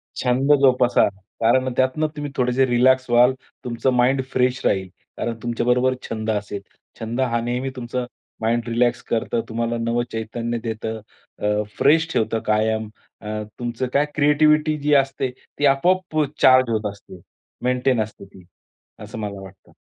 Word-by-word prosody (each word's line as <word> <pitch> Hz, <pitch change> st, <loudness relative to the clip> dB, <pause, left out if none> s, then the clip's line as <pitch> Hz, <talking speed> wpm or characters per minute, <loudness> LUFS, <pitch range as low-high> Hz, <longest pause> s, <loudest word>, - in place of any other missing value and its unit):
छंद 130 Hz, +3 st, +2 dB
जोपासा, 125 Hz, -2 st, +4 dB, 0.3 s
कारण 130 Hz, +3 st, +3 dB
त्यातनं 130 Hz, +4 st, +1 dB
तुम्ही 145 Hz, -1 st, -5 dB
थोडेसे 125 Hz, +1 st, +2 dB
रिलॅक्स 130 Hz, +1 st, +3 dB
व्हाल. 120 Hz, +2 st, +5 dB, 0.3 s
तुमचं 125 Hz, +2 st, -1 dB
माइंड 130 Hz, +2 st, +3 dB
फ्रेश 125 Hz, 0 st, +1 dB
राहील 95 Hz, -1 st, +1 dB, 0.3 s
कारण 115 Hz, -1 st, -2 dB
तुमच्याबरोबर 125 Hz, +2 st, +1 dB, 0.2 s
छंद 110 Hz, 0 st, -3 dB
असेल. 100 Hz, -1 st, -3 dB, 0.4 s
छंद 115 Hz, +3 st, -3 dB
हा 120 Hz, -2 st, +1 dB
नेहमी 125 Hz, +3 st, -2 dB
तुमचा 125 Hz, 0 st, -4 dB, 0.4 s
माइंड 115 Hz, +2 st, 0 dB
रिलॅक्स 120 Hz, +1 st, +1 dB
करतं, 115 Hz, 0 st, -1 dB
तुम्हाला 115 Hz, +1 st, -2 dB
नवं 115 Hz, +1 st, 0 dB
चैतन्य 115 Hz, +1 st, -3 dB
देतं, 110 Hz, -1 st, -4 dB, 0.4 s
अ, 105 Hz, 0 st, 0 dB
फ्रेश 160 Hz, +3 st, +4 dB
ठेवतं 110 Hz, 0 st, 0 dB
कायम 110 Hz, 0 st, +1 dB, 0.3 s
अ, 105 Hz, -, -9 dB, 0.3 s
तुमचं 120 Hz, +1 st, -3 dB
काय 145 Hz, +1 st, +3 dB
क्रिएटिव्हिटी 150 Hz, +1 st, +3 dB
जी 145 Hz, +1 st, +1 dB
असते 135 Hz, -1 st, +1 dB, 0.3 s
ती 145 Hz, -, +2 dB
आपोआप 165 Hz, +5 st, +2 dB, 0.2 s
चार्ज 130 Hz, -1 st, +6 dB
होत 110 Hz, -1 st, -1 dB
असते, 100 Hz, -2 st, -14 dB, 0.4 s
मेंटेन 125 Hz, -1 st, +1 dB
असते 105 Hz, -2 st, -6 dB
ती 95 Hz, -1 st, -17 dB, 0.6 s
असं 110 Hz, +2 st, -8 dB
मला 100 Hz, -2 st, -5 dB
वाटतं. 95 Hz, 0 st, -14 dB
120 Hz, 145 wpm, -22 LUFS, 115-130 Hz, 0.6 s, चार्ज